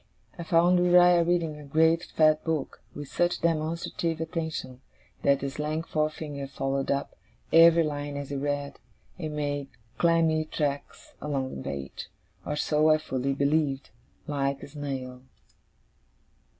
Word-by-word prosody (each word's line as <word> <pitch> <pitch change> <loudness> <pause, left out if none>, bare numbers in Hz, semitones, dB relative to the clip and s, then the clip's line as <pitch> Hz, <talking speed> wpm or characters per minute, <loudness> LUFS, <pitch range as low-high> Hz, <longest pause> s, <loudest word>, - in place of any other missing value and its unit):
I - - -7
found 170 +2 +3
Uriah 175 -1 +6
reading 165 -3 0
a - - -10
great 160 +4 +3
fat 155 -1 +3
book, 160 -4 -3
with 145 -1 -6
such 175 +4 0
demonstrative 165 0 -1
attention, 160 -6 -4 0.4
that 140 -1 +3
his 140 +1 -5
lank 155 +2 -2
forefinger 155 -3 -3
followed 135 0 -2
up 140 0 -1 0.4
every 165 0 +7
line 145 -1 -4
as 140 -1 -6
he - - -2
read, 145 0 -3 0.4
and 155 -3 -4
made 145 -1 -2 0.3
clammy 165 -2 +3
tracks 145 -2 -4
along 135 -3 -3
the 65 - -6
page 70 0 -6 0.4
(or 150 - -1
so 150 +1 +2
I 155 - +6
fully 135 -3 -2
believed) 140 -1 0 0.3
like 140 -1 -2
a - - -7
snail. 135 -3 -6
150 Hz, 135 wpm, -27 LUFS, 140-165 Hz, 0.4 s, every